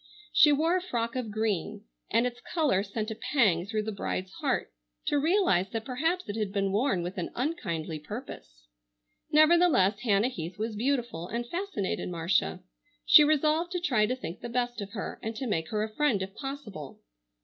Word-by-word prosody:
She 295 - +7
wore 320 +5 +3
a 370 - +1
frock 235 -10 -2
of 250 -4 -2
green, 210 -4 -2 0.3
and 230 - +3
its 245 0 -4
color 300 - +1
sent 215 +2 -4
a - - -4 0.2
pang 195 - +3
through 215 0 -1
the 220 - -3
bride's 190 -2 -3
heart - - -1 0.3
to 290 - +2
realize 315 - +2
that 225 +1 -4
perhaps 320 +8 -1
it 205 - -4
had 210 -3 -2
been 195 -1 0
worn 205 -4 +1
with 180 +2 -5
an 175 - -3
unkindly 180 - -2
purpose. 65 - -9 0.7
Nevertheless 310 - +5
Hannah 215 0 +2
Heath 170 -6 -6
was 220 +1 -3
beautiful 240 -8 -1
and 235 +4 -3
fascinated 345 - -3
Marcia. 180 +1 0 0.4
She 300 0 +9
resolved 310 +3 +2
to 360 - 0
try 245 -12 +2
to 250 - -1
think 185 -9 -7
the 240 - -5
best 240 -1 -1
of 200 +2 -7
her, 205 - -5
and 225 +1 -4
to 260 - -4
make 165 -9 -1
her 215 -1 0
a 215 0 -5
friend 295 -9 +2
if 190 0 -7
possible. 230 - -7
225 Hz, 185 wpm, -29 LUFS, 195-280 Hz, 0.7 s, She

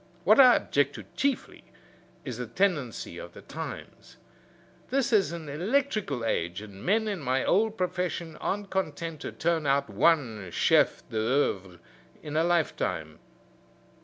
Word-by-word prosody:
What 215 +7 +5
I 255 -2 +9
object - - +1
to - - -7
chiefly 280 -1 -1 0.6
is 125 -4 -5
the 125 - -4
tendency 150 - -1
of - - -9
the - - -12
times. - - -8 0.7
This 270 -1 +1
is 200 -5 +4
an 170 -2 -6
electrical 185 - -1
age, 85 -4 -1
and 100 -2 -11
men 220 +3 +2
in 200 -3 -2
my 130 -2 0
old 220 +3 +2
profession 180 -3 -2
aren't 200 0 -3
content 165 -3 -3
to - - -5
turn 160 -2 0
out 140 -4 +1
one 110 - +2
chef - - +2
d'oeuvre 110 -6 0 0.5
in 150 -1 -6
a 160 - +3
lifetime. 155 - -1
160 Hz, 140 wpm, -28 LUFS, 125-195 Hz, 0.7 s, I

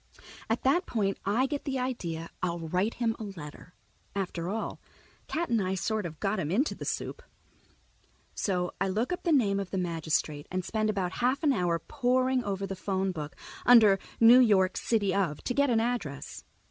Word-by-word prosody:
At 225 - 0
that 320 +8 +2
point 200 -4 -1
I 220 +7 +2
get 285 +1 -3
the 270 -2 -2
idea 175 -11 -3
I'll 175 -1 -1
write 180 +6 -1
him 230 -2 0
a - - -5
letter. 180 -3 -9 0.4
After 180 -3 -3
all, 220 +3 -3 0.5
Cat 340 +1 -2
and 230 -3 +2
I 190 0 -1
sort 215 0 -1
of 160 -2 -11
got 200 +1 0
him 155 - -2
into 245 - +1
the - - -8
soup. 475 - -3 1.1
So 180 -3 -1
I 195 - +2
look 220 - 0
up 360 - -4
the 340 - 0
name 205 -9 +3
of 195 -2 -4
the 195 - -3
magistrate 160 -4 -1
and 185 -1 -3
spend 215 -1 0
about 190 -3 -2
half 255 +5 +1
an 290 -3 +4
hour 175 -6 +1
poring 255 - +1
through 195 -3 -3
the 195 0 -5
phone 190 0 -1
book, 150 -5 -6 0.3
under 215 -5 +7 0.2
"New 235 +2 +8
York, 195 -6 +4
City 205 -5 +1
of," 175 -7 -1
to 250 - -1
get 280 +1 +3
an 230 -2 +3
address. 225 - -3
200 Hz, 190 wpm, -29 LUFS, 180-245 Hz, 1.1 s, New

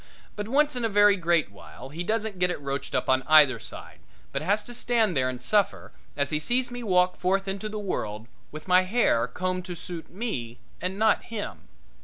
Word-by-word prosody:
But 210 0 -4
once 290 +3 +2
in 245 - -3
a 225 - +1
very 205 0 +5
great 170 - +1
while 110 +6 -12
he 165 +5 -5
doesn't 215 -1 -2
get 180 0 +3
it 175 - -3
roached 140 -1 -4
up - - 0
on 130 0 +3
either 145 -6 +6
side, 110 - -9 0.3
but - - -2
has 205 +6 +1
to 245 - -9
stand 230 -6 +1
there 130 -1 +2
and 125 -1 -5
suffer 205 +7 0 0.3
as 140 -1 0
he 150 - +1
sees 245 +9 0
me 245 0 -6
walk 180 -4 +2
forth 195 +2 0
into 195 +2 -3
the 215 - -5
world 110 - -4 0.2
with 155 +3 -9
my 180 0 +6
hair 185 - +2
combed 185 0 -3
to 180 -2 -6
suit 170 0 -8
me 130 - -4 0.2
and 185 +2 -2
not 220 0 +2
him. 225 -3 -6
185 Hz, 210 wpm, -26 LUFS, 150-215 Hz, 0.3 s, either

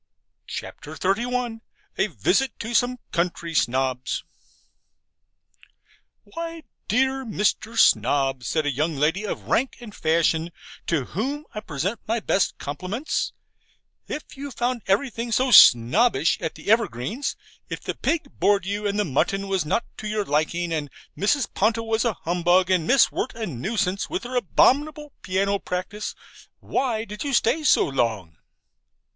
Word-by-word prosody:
CHAPTER 155 +2 -7
XXXI 235 +5 -1 0.4
A - - +3
VISIT 270 -2 0
TO 230 +2 -5
SOME 245 +2 +2
COUNTRY 170 -1 -1
SNOBS 130 -2 0 2.0
'Why, 330 -1 -7 0.2
dear 265 +3 +1
Mr. 220 0 -1
Snob,' 135 - +3
said 155 +4 0
a 145 - +1
young 155 +4 -1
lady 165 +9 0
of - - -4
rank 265 +3 0
and 230 -4 -10
fashion 165 0 +1 0.4
(to 150 -6 0
whom 275 - -3
I 210 - -4
present 190 - -3
my 230 +2 +1
best 195 -2 0
compliments), 185 - -3 0.7
'if 300 - -6
you 280 +1 -6
found 245 -1 -2
everything 230 +3 0
so 255 +4 +2
SNOBBISH 155 - +6
at 160 -2 -3
the - - -2
Evergreens, 220 - 0 0.3
if - - -4
the - - -3
pig 320 -4 -1
bored 200 -2 +3
you 205 +2 -2
and 200 0 -1
the 210 - +1
mutton 195 +7 0
was 190 -4 0
not 230 +10 0
to 215 - -5
your 210 -1 -1
liking, 165 +3 0
and 150 -3 -2 0.3
Mrs. 240 +7 +1
Ponto 225 +3 +1
was 225 +1 0
a 235 - +2
humbug, 175 +2 +2
and 175 -3 +2
Miss 275 - +5
Wirt - - -3
a 225 -1 -3
nuisance, 190 - -2
with 355 -1 -3
her 250 +1 -6
abominable 295 - +2
piano 195 +2 0
practice, 190 +4 -4 0.4
why 230 -4 -1
did 210 0 -6
you 285 -2 -2
stay 305 +9 +2
so - - +5
long?' 110 - -2
205 Hz, 145 wpm, -24 LUFS, 165-240 Hz, 2.0 s, SNOBBISH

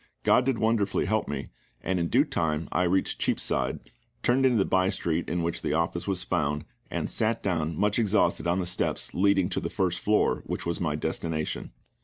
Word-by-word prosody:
GOD 125 - +4
did 135 -3 +1
wonderfully 110 -3 +1
help 110 +1 0
me, 70 -2 -4 0.3
and 95 +1 0
in 85 - 0
due - - +4
time 80 -1 -1
I 90 - +2
reached 95 +2 0
Cheapside, - - 0 0.4
turned 130 +2 +4
into 125 -3 +2
the 95 - +3
by 95 0 +2
street 85 -4 -1
in 85 0 -1
which 85 0 -2
the - - -1
office 85 +3 -1
was 95 -2 0
found, 75 -5 -1 0.2
and - - -2
sat 115 +1 0
down 80 -4 -1
much 105 +3 +1
exhausted 105 -5 +2
on 85 +1 +2
the 90 - -1
steps 90 - 0
leading 95 -1 +3
to 90 - -1
the - - -4
first 90 -3 0
floor, 105 0 +2
which - - -4
was 85 +1 -2
my 80 -4 0
destination. 80 0 -3
90 Hz, 200 wpm, -27 LUFS, 85-100 Hz, 0.4 s, GOD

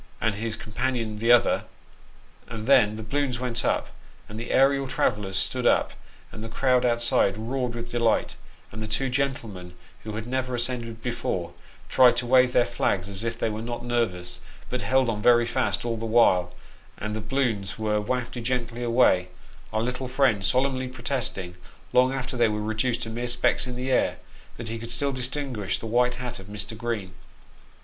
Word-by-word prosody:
and 110 0 +1
his 110 +1 -3
companion 115 -1 -3
the 115 +2 +3
other; 120 -1 +4 0.8
and 110 -1 -6
then 110 -5 +5
the 110 - -6
balloons 130 +2 -1
went 125 -2 -1
up, - - 0 0.4
and 105 +1 -7
the 115 - -6
aerial 135 0 +3
travellers 105 -6 0
stood - - 0
up, - - +3 0.4
and 110 - -8
the 115 - -6
crowd 125 0 +2
outside 120 -4 +2
roared 120 +2 -2
with 120 0 -6
delight, 115 -2 +1 0.4
and 110 - -7
the 110 - -3
two 130 +6 -1
gentlemen 115 -10 -3 0.3
who 110 - -6
had 110 0 -4
never 130 0 -2
ascended 120 -2 -1
before, 90 -8 -2 0.3
tried 125 -2 +5
to 120 - -1
wave 125 0 +5
their 125 -1 +4
flags, 95 -2 -1
as 100 +1 -3
if 115 0 -2
they - - 0
were 110 0 -3
not 120 +1 -5
nervous, 115 -8 -1 0.3
but 125 - -1
held 130 0 +2
on 110 -2 -1
very 120 +1 +5
fast 120 0 -1
all 115 -1 -1
the 115 +1 -4
while; 95 -6 +4 0.5
and 105 +1 -4
the 110 - -3
balloons 110 -4 -1
were 105 -1 0
wafted 120 +2 -3
gently 120 -1 -2
away, 115 -7 +3 0.4
our 110 +1 0
little 130 +2 -3
friend 125 -6 +2
solemnly 130 +5 +1
protesting, 120 -7 -3 0.4
long 130 +1 +5
after 135 -1 -3
they 120 -2 +4
were 105 -1 -1
reduced 110 +3 -1
to 115 - -4
mere 120 +2 -3
specks 120 +1 +2
in 125 - -5
the 130 +2 -3
air, - - +2 0.4
that 120 - -6
he 115 0 -4
could 115 +1 -7
still 140 +4 0
distinguish 130 -5 -3
the - - -8
white 125 +2 +2
hat 120 -2 -5
of 95 - -12
Mr. 105 +2 -5
Green. 110 -5 -3
120 Hz, 185 wpm, -26 LUFS, 110-125 Hz, 0.8 s, then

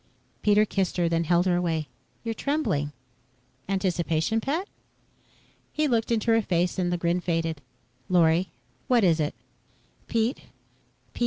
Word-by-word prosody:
Pete 210 0 +4
kissed 190 -3 -1
her, 175 -1 +2
then 165 0 0
held 175 +2 +3
her 180 -2 +2
away. 165 -4 -1 0.4
"You're 230 -1 -2
trembling. 220 - -1 0.8
Anticipation, 185 +1 0
pet?" 320 - -2 1.0
He 305 0 +1
looked 230 -3 0
into 230 0 +2
her 225 0 +4
face 180 -1 0
and 175 -1 0
the 175 - 0
grin 170 +1 0
faded. 165 -3 -1 0.5
"Lorry, 175 0 +3 0.4
what 245 -3 +4
is 170 -3 +4
it?" 150 -4 -1 0.7
"Pete 230 +2 0 0.8
Pete. - - -10
180 Hz, 140 wpm, -26 LUFS, 165-225 Hz, 1.0 s, Pete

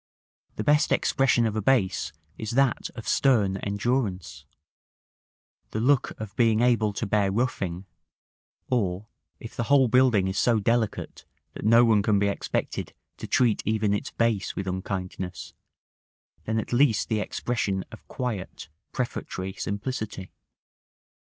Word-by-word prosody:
The - - -3
best 150 0 +3
expression 130 -3 +2
of 110 -1 -1
a 110 - 0
base 105 -5 +1 0.2
is 110 +2 -5
that 135 -2 +2
of 115 - -8
stern 105 -8 +3
endurance, 100 -1 -2 1.2
the 110 - -3
look 130 +3 +1
of 110 -3 -7
being 115 -2 +3
able 115 -3 +3
to 105 - -3
bear 100 -1 +1
roughing; 95 -5 -2 0.8
or, 100 -5 -1 0.3
if 115 - -10
the 115 - -2
whole 140 -1 +5
building 120 -6 +4
is 95 +1 -1
so 115 -3 +3
delicate 115 0 -1 0.3
that - - -7
no 115 +2 +6
one 110 -3 +4
can 105 0 +2
be 100 0 +2
expected 100 - -3 0.2
to - - -7
treat 120 -5 +2
even 110 -1 +1
its 105 - -2
base 115 -4 0
with 100 - -3
unkindness, 95 -1 -5 0.9
then 110 0 -1
at 110 - -3
least 120 -3 +3
the 110 -2 0
expression 105 -3 -2
of - - -13
quiet, 105 -10 -5 0.2
prefatory 95 -6 -4
simplicity. 100 -2 -4
110 Hz, 140 wpm, -26 LUFS, 100-120 Hz, 1.2 s, no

